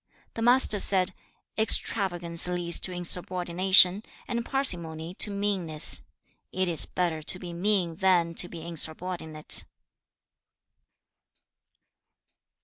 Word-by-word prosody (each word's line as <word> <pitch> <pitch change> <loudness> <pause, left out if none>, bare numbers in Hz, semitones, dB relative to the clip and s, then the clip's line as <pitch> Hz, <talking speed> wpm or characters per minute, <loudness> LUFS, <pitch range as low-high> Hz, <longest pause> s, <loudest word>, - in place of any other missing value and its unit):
The 225 - -7
Master 240 -3 +3
said, 190 -1 +1 0.5
'Extravagance 175 -6 +3
leads 175 -1 -1
to 185 - -3
insubordination, 180 +2 +3 0.3
and 235 -1 -4
parsimony 170 - -3
to - - +4
meanness. 195 -6 +1 0.5
It 185 0 -2
is 165 -3 +1
better 170 -3 -3
to 160 - -1
be 175 -2 -10
mean 175 -2 -2
than 175 -3 0
to 175 +1 -1
be 165 -2 -10
insubordinate.' 160 -1 -1
180 Hz, 100 wpm, -25 LUFS, 170-195 Hz, 0.5 s, to